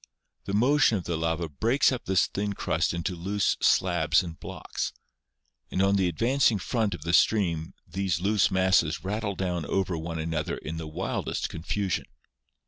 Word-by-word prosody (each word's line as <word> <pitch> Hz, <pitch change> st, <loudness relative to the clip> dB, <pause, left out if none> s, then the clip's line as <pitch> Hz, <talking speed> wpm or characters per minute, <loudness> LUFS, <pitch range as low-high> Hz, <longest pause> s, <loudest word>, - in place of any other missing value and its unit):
The 100 Hz, -, -2 dB
motion 125 Hz, 0 st, +4 dB
of 90 Hz, -, -5 dB
the 85 Hz, -, -2 dB
lava 80 Hz, +1 st, -1 dB
breaks 115 Hz, -, +2 dB
up 125 Hz, -, -4 dB
this 95 Hz, -3 st, +3 dB
thin 100 Hz, 0 st, -3 dB
crust -, -, 0 dB
into 85 Hz, +1 st, -3 dB
loose 95 Hz, +4 st, 0 dB
slabs -, -, +3 dB
and 85 Hz, -2 st, -8 dB
blocks, -, -, -5 dB, 0.8 s
and -, -, -2 dB
on 100 Hz, +1 st, +3 dB
the 95 Hz, -2 st, +2 dB
advancing 115 Hz, -, +2 dB
front 105 Hz, 0 st, -1 dB
of 75 Hz, -, -11 dB
the 85 Hz, +1 st, -2 dB
stream 85 Hz, -6 st, +2 dB
these 90 Hz, -2 st, -1 dB
loose 100 Hz, +2 st, +2 dB
masses 95 Hz, -4 st, +2 dB
rattle 100 Hz, +1 st, -2 dB
down 90 Hz, -3 st, -2 dB
over 95 Hz, +3 st, -1 dB
one 80 Hz, +1 st, -4 dB
another 80 Hz, -1 st, -2 dB
in 80 Hz, +1 st, -6 dB
the 80 Hz, -1 st, -5 dB
wildest 75 Hz, -, -3 dB
confusion. 90 Hz, +4 st, -2 dB
95 Hz, 165 wpm, -27 LUFS, 85-105 Hz, 0.8 s, motion